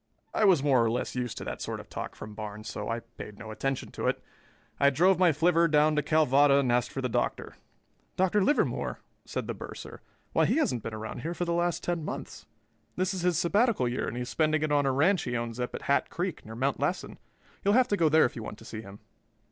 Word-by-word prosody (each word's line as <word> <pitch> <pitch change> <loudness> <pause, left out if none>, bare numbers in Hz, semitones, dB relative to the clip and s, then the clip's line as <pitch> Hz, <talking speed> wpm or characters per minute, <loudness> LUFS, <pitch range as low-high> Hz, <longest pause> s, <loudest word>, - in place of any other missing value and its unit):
I 215 - +3
was 180 -8 +5
more 135 -5 +4
or 115 - +2
less 120 +2 -2
used 125 -2 -3
to - - -5
that - - -5
sort - - -4
of - - -11
talk - - -6
from 110 - -9
Barnes 105 0 -7
so 105 - -5
I 115 +1 -2
paid 115 -3 -11
no 110 -1 -8
attention 135 +4 -3
to - - -3
it. - - +1 0.6
I 140 - +6
drove 175 +6 +3
my 180 -2 +5
flivver 170 +2 +3
down 150 0 +3
to 150 - +2
Calvada 145 -2 +4
and 135 -3 +2
asked 120 0 +1
for 135 - -4
the - - +1
Doctor. 120 - -2 0.6
"Dr. 190 +2 +2
Livermore?" 290 - +1 0.3
said - - -4
the - - -3
bursar. - - -9 0.3
"Why, - - +4
he - - +2
hasn't 125 - +1
been 110 +1 -5
around 110 +2 -6
here 165 +6 -4
for 175 - -2
the 170 - -1
last 175 0 0
ten 175 -2 -1
months. - - -7 0.5
This 185 +1 0
is 185 - -3
his 175 -2 +2
sabbatical 195 - +2
year 120 +1 -2
and - - -4
he 125 - -2
is 125 - -7
spending 155 -1 +1
it 155 - 0
on 145 -1 +3
a - - +3
ranch 160 +7 +3
he 120 -1 -2
owns 115 0 -4
up 125 - -3
at - - -7
Hat 140 - +1
Creek, 180 -2 -3
near 110 +1 -9
Mount 135 +3 0
Lassen. - - -2 0.4
You'll 200 +2 +3
have 255 0 +5
to 205 - +2
go 165 -5 +3
there 155 +1 +5
if - - -3
you 115 - -5
want 105 - -7
to 110 - -14
see 110 -2 -6
him." 100 -1 -12
140 Hz, 250 wpm, -28 LUFS, 120-170 Hz, 0.6 s, I